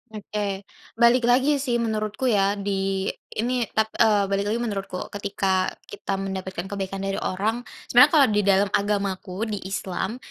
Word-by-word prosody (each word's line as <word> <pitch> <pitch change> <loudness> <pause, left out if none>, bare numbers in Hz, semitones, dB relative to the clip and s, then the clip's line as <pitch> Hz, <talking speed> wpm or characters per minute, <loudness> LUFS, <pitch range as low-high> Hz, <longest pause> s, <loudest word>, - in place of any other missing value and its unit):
Oke. 205 -1 -3 0.3
balik 235 +1 +4
lagi 265 +4 +3
sih, 260 -3 -1
menurutku 220 +1 -1
ya. 200 0 +2
Di 195 -1 -1 0.2
ini, 240 +1 0
tap 220 0 +2
eee, 210 -2 +5
balik 200 +1 0
lagi 225 +3 0
menurutku. 195 -4 -4
Ketika 190 -2 0 0.2
kita 200 -1 -4
mendapatkan 190 -2 -4
kebaikan 195 0 -4
dari 195 0 -2
orang, 210 +5 -1 0.3
sebenarnya 250 +5 +8
kalau 280 -3 +7
di 210 - +2
dalam 200 -1 +3
agamaku, 200 -1 -1
di 205 - -2
Islam. 195 +2 -3
205 Hz, 150 wpm, -24 LUFS, 195-225 Hz, 0.3 s, sebenarnya